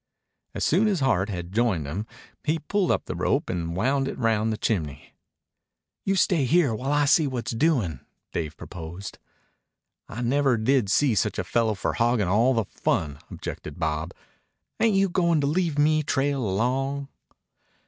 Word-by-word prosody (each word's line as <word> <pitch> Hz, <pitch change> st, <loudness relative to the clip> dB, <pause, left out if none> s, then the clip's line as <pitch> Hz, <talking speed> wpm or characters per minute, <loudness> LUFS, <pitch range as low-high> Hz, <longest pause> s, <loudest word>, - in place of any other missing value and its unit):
As -, -, -1 dB
soon 195 Hz, +8 st, +3 dB
as 195 Hz, -7 st, 0 dB
Hart 105 Hz, -7 st, +2 dB
had 90 Hz, -3 st, -5 dB
joined 105 Hz, -8 st, +1 dB
him 95 Hz, +10 st, -4 dB, 0.4 s
he 160 Hz, +1 st, +1 dB
pulled 185 Hz, +4 st, -1 dB
up -, -, +1 dB
the -, -, -4 dB
rope -, -, 0 dB
and 85 Hz, -1 st, -3 dB
wound 135 Hz, +7 st, +1 dB
it -, -, -5 dB
round 110 Hz, -2 st, +1 dB
the 110 Hz, -, -2 dB
chimney. 80 Hz, -, -3 dB, 0.9 s
"You 195 Hz, -, +2 dB
stay 175 Hz, -6 st, +2 dB
here 150 Hz, -2 st, +3 dB
while 130 Hz, +6 st, -2 dB
I 145 Hz, 0 st, +3 dB
see 150 Hz, +1 st, +4 dB
what's 120 Hz, -3 st, -3 dB
doin'," 115 Hz, -, +1 dB, 0.3 s
Dave 80 Hz, -1 st, -3 dB
proposed. 85 Hz, +3 st, -8 dB, 0.9 s
"I 120 Hz, +3 st, -5 dB
never 135 Hz, 0 st, +2 dB
did 115 Hz, -1 st, +2 dB
see 130 Hz, +4 st, +3 dB
such 105 Hz, -, 0 dB
a -, -, -1 dB
fellow 110 Hz, +3 st, +1 dB
for -, -, -2 dB
hoggin' 115 Hz, -4 st, +1 dB
all 115 Hz, +7 st, +3 dB
the 115 Hz, -3 st, +1 dB
fun," 75 Hz, -6 st, -2 dB
objected 75 Hz, -, -7 dB
Bob. 80 Hz, 0 st, -2 dB, 0.6 s
"Ain't 225 Hz, -3 st, +3 dB
you 195 Hz, 0 st, +4 dB
goin' 170 Hz, -3 st, +2 dB
to 145 Hz, -, +1 dB
leave 160 Hz, 0 st, 0 dB
me 155 Hz, +1 st, +3 dB
trail 140 Hz, -2 st, 0 dB
along?" 135 Hz, +7 st, -1 dB
120 Hz, 170 wpm, -25 LUFS, 95-145 Hz, 0.9 s, see